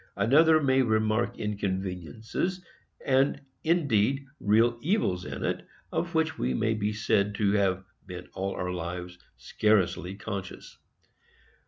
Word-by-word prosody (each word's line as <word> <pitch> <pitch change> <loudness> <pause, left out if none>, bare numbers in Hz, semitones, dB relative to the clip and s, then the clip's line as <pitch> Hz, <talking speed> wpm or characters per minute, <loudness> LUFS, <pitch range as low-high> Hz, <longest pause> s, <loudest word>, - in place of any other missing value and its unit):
Another 155 +5 +5
may 135 -2 +3
remark 110 +1 +1
inconveniences, 105 - -3 0.4
and, 135 +1 +3 0.2
indeed, 140 -5 +2
real 115 +3 +3
evils, 140 - 0
in - - -5
it, - - -2 0.2
of 170 0 -2
which 160 0 +1
we 65 +1 0
may 110 - +1
be 105 -1 -1
said 105 -1 +1
to 100 -1 +2
have 95 -2 +1 0.2
been 90 -1 -8
all 95 +1 -3
our 90 0 -3
lives 90 0 -5 0.2
scarcely 95 -3 +1
conscious. 100 -2 -7
105 Hz, 125 wpm, -28 LUFS, 95-130 Hz, 0.4 s, Another